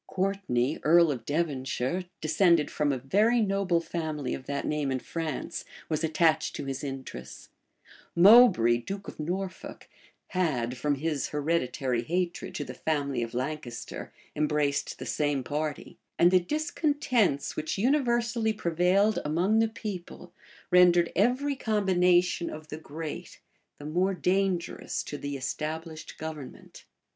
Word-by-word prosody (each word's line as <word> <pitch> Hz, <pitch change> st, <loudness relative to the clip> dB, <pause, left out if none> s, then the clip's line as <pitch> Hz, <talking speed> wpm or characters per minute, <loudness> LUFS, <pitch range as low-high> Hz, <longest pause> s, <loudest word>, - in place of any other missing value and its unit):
Courtney, 185 Hz, -9 st, -1 dB
earl 170 Hz, 0 st, +5 dB
of 120 Hz, -5 st, -6 dB
Devonshire, 145 Hz, +1 st, -1 dB, 0.2 s
descended 160 Hz, 0 st, +3 dB
from 150 Hz, -1 st, +1 dB
a 135 Hz, -, -1 dB
very 210 Hz, -, +2 dB
noble 195 Hz, -5 st, +1 dB
family 155 Hz, -5 st, -3 dB
of 130 Hz, -, -7 dB
that 140 Hz, 0 st, -2 dB
name 150 Hz, -3 st, -1 dB
in 130 Hz, -, 0 dB
France, 155 Hz, +2 st, -4 dB, 0.3 s
was 155 Hz, 0 st, -1 dB
attached 160 Hz, 0 st, +2 dB
to -, -, -5 dB
his 135 Hz, 0 st, -4 dB
interests: 130 Hz, -, -7 dB, 0.7 s
Moubray, 170 Hz, -, +7 dB
duke 195 Hz, +7 st, -6 dB
of -, -, -9 dB
Norfolk, 185 Hz, +4 st, -5 dB, 0.4 s
had, 130 Hz, -10 st, 0 dB
from 145 Hz, +3 st, 0 dB
his 150 Hz, 0 st, -2 dB
hereditary 135 Hz, -5 st, -1 dB
hatred 175 Hz, +6 st, -2 dB
to 145 Hz, -, -2 dB
the -, -, -7 dB
family 140 Hz, -5 st, -1 dB
of 115 Hz, +1 st, -4 dB
Lancaster, 130 Hz, -2 st, -5 dB, 0.2 s
embraced 150 Hz, -2 st, 0 dB
the -, -, -7 dB
same 145 Hz, -3 st, 0 dB
party: 150 Hz, +3 st, -4 dB, 0.2 s
and 175 Hz, -, +5 dB
the 185 Hz, -, +6 dB
discontents 255 Hz, -, 0 dB
which 155 Hz, +4 st, -3 dB
universally 235 Hz, -2 st, +1 dB
prevailed 185 Hz, +3 st, +2 dB
among 175 Hz, +9 st, +2 dB
the 225 Hz, -, +4 dB
people, 185 Hz, -5 st, -7 dB, 0.4 s
rendered 175 Hz, -1 st, +5 dB
every 255 Hz, -, +2 dB
combination 180 Hz, -6 st, +2 dB
of 155 Hz, 0 st, -9 dB
the 150 Hz, -, -5 dB
great 155 Hz, 0 st, -7 dB, 0.4 s
the 145 Hz, -, -10 dB
more 180 Hz, +5 st, +1 dB
dangerous 185 Hz, -1 st, -1 dB
to -, -, -6 dB
the 145 Hz, 0 st, -4 dB
established 155 Hz, +4 st, -5 dB
government. 155 Hz, -4 st, -9 dB
160 Hz, 135 wpm, -28 LUFS, 145-190 Hz, 0.7 s, Moubray